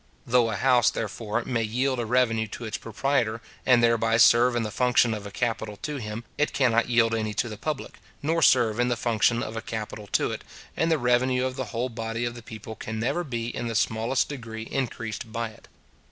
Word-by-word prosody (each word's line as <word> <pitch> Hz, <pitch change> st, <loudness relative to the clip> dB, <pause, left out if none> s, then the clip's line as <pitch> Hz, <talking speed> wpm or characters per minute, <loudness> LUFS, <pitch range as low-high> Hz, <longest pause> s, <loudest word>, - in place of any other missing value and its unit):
Though 120 Hz, -1 st, +3 dB
a 105 Hz, -, -2 dB
house, 125 Hz, +1 st, +4 dB
therefore, 110 Hz, +1 st, -3 dB
may 120 Hz, -3 st, 0 dB
yield 125 Hz, +4 st, 0 dB
a 115 Hz, -, -2 dB
revenue 115 Hz, -2 st, +2 dB
to 115 Hz, +3 st, -7 dB
its 110 Hz, -1 st, -4 dB
proprietor, 115 Hz, -1 st, 0 dB, 0.3 s
and 125 Hz, -2 st, +5 dB
thereby 115 Hz, -1 st, +3 dB
serve 120 Hz, +2 st, +6 dB
in 120 Hz, -, +1 dB
the 105 Hz, -, -4 dB
function 125 Hz, 0 st, +3 dB
of 105 Hz, -2 st, -5 dB
a -, -, -9 dB
capital 110 Hz, -2 st, -2 dB
to 150 Hz, -1 st, -3 dB
him, 110 Hz, -1 st, -5 dB, 0.2 s
it 150 Hz, -, +1 dB
cannot 120 Hz, -3 st, +2 dB
yield 115 Hz, -1 st, +3 dB
any 110 Hz, -2 st, -1 dB
to 120 Hz, -, 0 dB
the 110 Hz, -, -6 dB
public, 150 Hz, +6 st, -5 dB, 0.2 s
nor 165 Hz, +3 st, +1 dB
serve 120 Hz, -5 st, +4 dB
in 120 Hz, -, +3 dB
the 120 Hz, -1 st, 0 dB
function 115 Hz, +1 st, +2 dB
of 110 Hz, -, -6 dB
a 115 Hz, -, -3 dB
capital 110 Hz, -2 st, -6 dB
to -, -, +1 dB
it, -, -, -6 dB, 0.3 s
and 165 Hz, +1 st, +1 dB
the 160 Hz, -, +4 dB
revenue 125 Hz, 0 st, +2 dB
of 130 Hz, 0 st, -3 dB
the 130 Hz, -, -3 dB
whole 120 Hz, +3 st, -3 dB
body 115 Hz, 0 st, -3 dB
of 120 Hz, -, -2 dB
the 120 Hz, -, -10 dB
people 110 Hz, 0 st, -8 dB
can 110 Hz, 0 st, -5 dB
never 130 Hz, +10 st, 0 dB
be 120 Hz, -5 st, -4 dB
in 120 Hz, -, -3 dB
the 115 Hz, -, -3 dB
smallest 115 Hz, +4 st, +1 dB
degree 115 Hz, -5 st, -6 dB
increased 115 Hz, -3 st, -4 dB
by 115 Hz, 0 st, -2 dB
it. 110 Hz, -, -17 dB
115 Hz, 220 wpm, -26 LUFS, 110-125 Hz, 0.3 s, serve